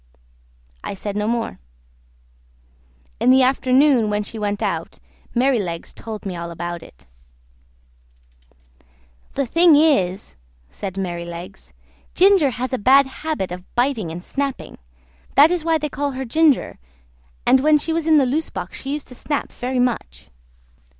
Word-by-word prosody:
I - - -5
said 200 +1 -5
no 210 0 -1
more. 230 - -2 1.6
In - - +3
the 260 0 +6
afternoon, 260 -2 +3
when 210 0 -1
she 220 +2 -8
went 205 -1 -2
out, - - -3 0.4
Merrylegs 230 -10 0
told 220 -2 -8
me 190 -2 -4
all 170 0 -5
about 175 0 -5
it. 65 +3 -16 2.3
"The 275 - -1
thing 335 +4 +5
is 210 - +2
this," - - -28 0.4
said 190 - -6
Merrylegs. 175 0 -6 0.4
"Ginger 380 -6 +5
has 255 +1 -4
a 255 - 0
bad 270 +6 +6 0.2
habit 300 - -2
of 180 0 -9
biting 240 -7 0
and 175 +2 -7
snapping; 275 +3 -4 0.6
that 295 +4 +7
is 355 -3 -1
why 325 0 +2
they 300 -1 -3
call 285 0 -3
her 265 +1 -4
Ginger, 305 +3 +2 0.7
and 260 - +5
when 300 +3 +4
she 320 +2 -2
was 325 -1 -2
in 315 -1 +6
the 275 - +4
loose 300 +6 -1
box 180 -1 -7
she 275 +1 -4
used 295 -1 -5
to - - -9
snap 290 +3 -3
very 255 +1 -4
much. 230 - -2
250 Hz, 150 wpm, -21 LUFS, 195-285 Hz, 2.3 s, that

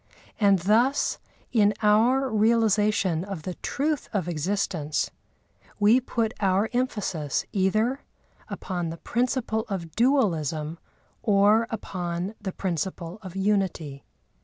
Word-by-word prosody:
And 200 -3 +5
thus, 225 +10 +2 0.3
in 210 -3 +3
our 235 +6 +4
realisation 210 -5 +2
of 190 -5 -6
the 185 - -4
truth 295 0 -1
of 190 -6 -1
existence, 170 -2 -1 0.7
we 215 +5 +5
put 230 -2 -1
our 195 +2 +1
emphasis 205 - -1
either 215 +7 +1 0.5
upon 175 -4 -4
the 165 - -6
principle 240 0 -1
of 175 -5 -4
dualism 165 - +1 0.4
or 210 +2 +4
upon 180 -3 -4
the 195 -2 -3
principle 180 +1 -4
of 185 -3 -9
unity. 190 -8 -1
200 Hz, 110 wpm, -26 LUFS, 175-225 Hz, 0.7 s, And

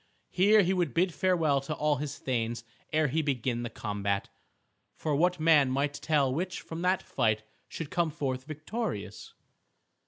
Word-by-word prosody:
Here 205 +3 +5
he 185 +2 +1
would 175 -9 0
bid 180 0 +2
farewell 165 -7 +2
to 150 +3 -4
all 150 0 +1
his 145 0 -4
thanes 115 -2 -2 0.3
ere 155 0 +3
he 155 +5 0
began 125 -4 -1
the 120 - -4
combat. 100 -2 -2 0.7
For 150 -2 -1
what 175 +3 +2
man 155 -4 +5
might 140 +2 0
tell 140 -2 +1
which 180 +5 -2
from 165 +1 -7
that 185 +1 +1
fight 110 -1 0 0.2
should 160 -3 -6
come 170 -2 +1
forth 130 -3 -3
victorious? 155 - -5
150 Hz, 160 wpm, -29 LUFS, 130-170 Hz, 0.7 s, Here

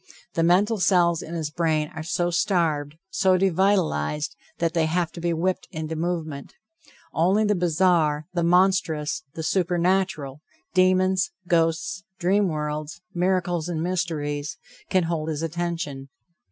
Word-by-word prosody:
The 165 - 0
mental 195 +6 +3
cells 175 -3 +3
in 170 - -7
his 155 -2 -3
brain 155 -2 0
are 160 - -5
so 175 +1 -1
starved, 160 -5 +1 0.2
so 190 -1 +3
devitalized, 180 - +1 0.2
that 165 -1 0
they 165 -2 +2
have 170 +1 0
to 170 - -9
be 170 0 0
whipped 180 +3 -1
into 160 0 -4
movement. 160 -4 -3 0.6
Only 190 +6 +3
the 210 - +3
bizarre, 170 -4 +2
the 175 - 0
monstrous, 170 -3 +2
the 160 - -4
supernatural, 175 -5 0 0.3
demons, 185 - +3 0.2
ghosts, 165 +2 +1
dream 195 +3 +2
worlds, 150 -1 -3
miracles 175 -2 0
and 165 -2 -2
mysteries, 155 -5 -2 0.3
can 185 -1 +3
hold 165 -2 -2
his 155 0 -3
attention. 165 -4 -3
170 Hz, 135 wpm, -24 LUFS, 155-185 Hz, 0.6 s, mental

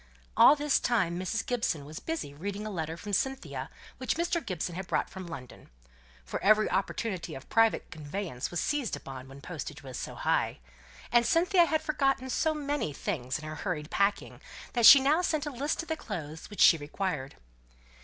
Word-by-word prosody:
All 290 - +8
this 295 -1 +2
time 180 -8 +1
Mrs. 185 +5 -2
Gibson 220 - -1
was 155 +2 -8
busy 320 - -4
reading 200 +7 -5
a 215 - -4
letter 160 -3 -4
from 205 +4 -7
Cynthia 265 +7 -2 0.3
which 260 - 0
Mr. 335 0 0
Gibson 180 -5 -3
had 185 +1 -5
brought - - -1
from 190 -2 -8
London; 135 -7 -10 0.6
for - - -5
every 215 +1 +5
opportunity 190 -4 -2
of 135 - -10
private 225 0 +2
conveyance 155 -3 -5
was 175 - -2
seized 290 - -1
upon 130 -1 -9
when 135 +1 -12
postage 150 -3 -7
was 130 -2 -7
so - - -6
high; - - 0 0.5
and 240 0 +5
Cynthia 345 - +4
had 315 -1 0
forgotten 270 -4 0
so 315 +4 +1
many 290 - -2
things 135 -7 -3
in 155 - -9
her 155 0 -6
hurried 155 -4 -4
packing, 200 +1 0 0.3
that 235 -2 +6
she 280 - +12
now 290 +6 +3
sent 310 -4 0
a 295 - -3
list 285 +5 -2
of - - -13
the 320 - -1
clothes 160 - -7
which 205 - -4
she 165 - +8
required. 145 -2 -3
200 Hz, 185 wpm, -29 LUFS, -, 0.6 s, she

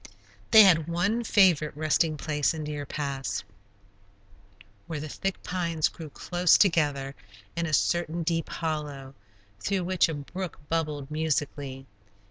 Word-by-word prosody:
They 220 -1 +9
had 165 -5 +5
one 190 +8 0
favorite 175 -10 +3
resting 155 0 +1
place 150 +1 0
in 155 - -4
Deer 150 -1 -5
Pass, 135 -10 -3 1.4
where 160 -2 -4
the 155 - -5
thick 195 +5 -4
pines 170 -4 0
grew 160 -2 -9
close 175 +3 +3
together 145 -7 +2 0.4
in 170 0 -1
a 155 - -4
certain 170 +2 +1
deep 165 0 -1
hollow, 150 -4 -4 0.5
through 190 - -1
which 180 -1 +2
a 160 - -3
brook 175 +5 -6
bubbled 150 -3 -2
musically. 145 -3 -2
155 Hz, 130 wpm, -27 LUFS, 145-175 Hz, 1.4 s, They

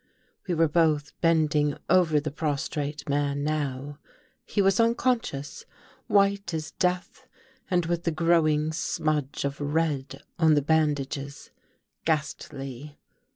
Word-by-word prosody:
We 175 - 0
were 165 0 +4
both 150 -2 +1
bending 155 -3 +2
over 170 -4 +4
the 150 0 -4
prostrate 145 0 -3
man 145 0 0
now. 145 -1 -3 0.5
He - - -2
was 195 +1 +3
unconscious 230 - 0 0.2
— - - -26
white 200 -3 +2
as 155 -1 -4
death, 180 +7 -2 0.4
and 175 -2 +2
with 170 0 -1
the - - +3
growing 155 -2 +2
smudge 155 -4 -1
of 140 +1 -4
red 145 -3 -1 0.2
on 160 -2 +5
the 145 - +2
bandages, 145 -2 -1 0.5
ghastly. 145 -2 -3
155 Hz, 120 wpm, -26 LUFS, 145-170 Hz, 0.5 s, on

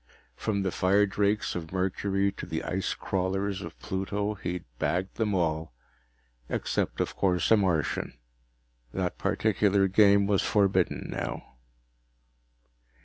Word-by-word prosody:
From 100 - -1
the 95 - 0
firedrakes 100 +2 +2
of 80 -2 -5
Mercury 95 +1 0
to - - -8
the 80 - -3
ice 95 +1 -2
crawlers 95 +1 -1
of - - -8
Pluto, 100 +2 -2
he'd 90 -3 -4 0.2
bagged 90 +2 -1
them 105 -3 +1
all. 80 -5 -1 0.7
Except, - - -1
of - - -1
course, 90 -2 +1
a 110 - +8
Martian. 90 -7 0 0.8
That 90 -1 -2
particular 100 -1 +2
game 100 +1 +5
was 100 -1 +2
forbidden 100 -3 +2
now. - - -5
95 Hz, 120 wpm, -28 LUFS, 90-100 Hz, 0.8 s, a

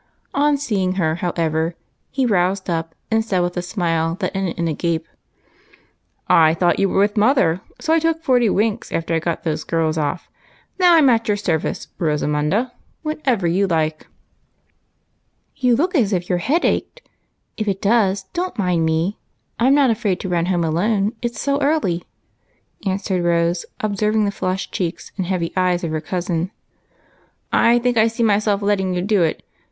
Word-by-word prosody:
On 290 0 +2
seeing 200 -9 -1
her, 165 -4 0
how 175 0 -1
ever, 160 0 0 0.3
he 265 -1 0
roused 190 -3 +1
up 165 -1 -3 0.2
and 225 0 +2
said 190 -5 0
with 175 0 -1
a 180 - -1
smile 165 -3 -1
that 190 -1 -2
ended 190 -3 -2
in 170 -1 0
a 160 - 0
gape, 165 +1 -2 0.4
— - - -32
" - - -46 0.2
I 160 - +2
thought 175 +1 +2
you 195 - +2
were - - -1
with 205 +2 +2
mother, 205 - +3 0.2
so 320 - 0
I 330 - +4
took 325 0 0
forty 245 -5 +3
winks 220 +3 0
after 165 0 -2
I 165 - +2
got 165 0 -3
those 155 -1 -2
girls 160 -1 0
off. 150 +3 -2 0.5
Now, 355 -2 +6
I - - +6
'm 290 -4 +6
at 230 -1 +1
your 205 -1 +1
service, 170 -6 -2
Rosamunda, 150 - 0 0.3
whenever 275 - -1
you 185 +4 +2
like." 155 -3 -1 0.8
" - - -47
You 250 -3 +3
look 345 +9 0
as 225 - +2
if 180 -1 -2
your 180 -2 +1
head 310 - +1
ached. - - -2 0.5
If 215 - -3
it 195 -1 0
does, 200 -2 +2
don't 360 -6 -3
mind 180 -5 +1
me. 160 +5 0 0.4
I 235 - +3
'm 275 - +5
not 275 -4 +4
afraid 210 -5 -1
to 190 - -4
run 175 -1 0
home 175 -2 +1
alone, 200 +6 +1
it 240 -1 -3
's - - -5
so 280 +1 0
early," 275 - +1 0.8
answered 190 -1 -1
Rose, 170 0 +1
observing 215 +1 +1
the 200 - 0
flushed 185 -1 -3
cheeks 175 -2 -4
nnd 185 - 0
heavy 175 -2 -2
eyes 180 -1 +1
of 165 - -2
her 155 -1 -2
cousin. 175 +1 -2 0.6
" - - -36 0.2
I 235 +1 +5
think 240 0 0
I 220 0 +5
see 230 +1 -2
myself 205 -1 +2
letting 190 -3 +1
you 180 - -1
do 205 -1 +2
it. 160 -2 0
190 Hz, 190 wpm, -20 LUFS, 170-225 Hz, 0.8 s, Now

